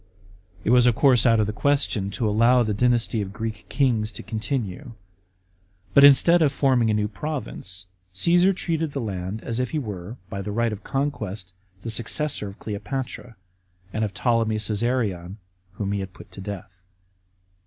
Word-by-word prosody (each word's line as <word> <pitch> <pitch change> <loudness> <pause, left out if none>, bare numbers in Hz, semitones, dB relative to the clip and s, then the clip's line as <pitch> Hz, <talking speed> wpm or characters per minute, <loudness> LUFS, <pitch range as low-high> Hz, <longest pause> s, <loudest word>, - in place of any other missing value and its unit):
It 110 - +1
was 125 0 +6
of 120 - +4
course 130 -3 +5
out 115 -1 +4
of 105 - +3
the 105 - -3
question 130 -6 +1
to 110 +3 -1
allow 115 +4 +4
the 110 -2 -1
dynasty 120 0 +2
of 100 -1 -5
Greek 110 0 -5
kings 115 -6 +1
to - - -8
continue. 115 +2 -4 1.0
But 140 - +7
instead 165 +5 +7
of 150 -3 +4
forming 130 -5 +2
a 105 - +2
new 105 0 +1
province, 100 -6 -6 0.3
Caesar 175 - +4
treated 165 -5 -2
the 140 - -2
land 100 -2 -4
as 115 0 -3
if 125 -1 0
he 155 - -2
were, 105 -4 -5
by 100 +2 -5
the 105 - -4
right 115 +1 0
of 105 - -8
conquest, 110 -10 -3 0.3
the 115 - -3
successor 120 +1 -1
of 100 - -10
Cleopatra, 115 +3 -5 0.6
and 110 - 0
of 105 - -1
Ptolemy 115 -1 +1
Csesarion, 105 -4 -1 0.4
whom 100 +1 -3
he 100 - -1
had 95 -1 -6
put - - -14
to 95 - -10
death. 95 -2 -8
115 Hz, 175 wpm, -24 LUFS, 100-130 Hz, 1.0 s, But